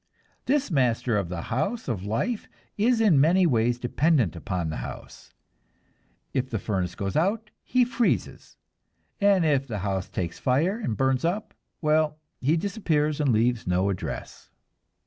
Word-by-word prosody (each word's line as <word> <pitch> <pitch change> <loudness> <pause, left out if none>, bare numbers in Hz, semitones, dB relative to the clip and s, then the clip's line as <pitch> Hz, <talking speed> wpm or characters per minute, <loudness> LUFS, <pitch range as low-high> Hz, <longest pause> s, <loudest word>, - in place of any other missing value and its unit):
This 285 -4 +1
master 125 -5 +1
of 100 -4 -1
the 85 -2 -4
house 200 - -1
of 115 -8 -2
life 205 - -1 0.3
is 230 +3 +2
in 190 -11 +5
many 180 +5 +4
ways 120 -5 +2
dependent 125 - +1
upon 85 -1 -3
the - - -4
house. - - -9 1.0
If 130 -1 -1
the 115 - -2
furnace 95 -4 -2
goes 100 -1 -3
out 210 +6 0
he 250 -1 +2
freezes, 235 -1 -1 0.6
and 200 -4 +4
if 140 -3 +2
the 110 -4 -4
house 95 -1 -2
takes 85 -2 -4
fire 160 - +1
and 115 - -2
burns 130 -1 +1
up 185 +6 -1 0.3
well, 155 0 +2 0.2
he 150 +6 +2
disappears 160 -7 0
and 140 -3 +3
leaves 115 0 +1
no 90 +2 +2
address. 95 - -6
135 Hz, 150 wpm, -26 LUFS, -, 1.0 s, in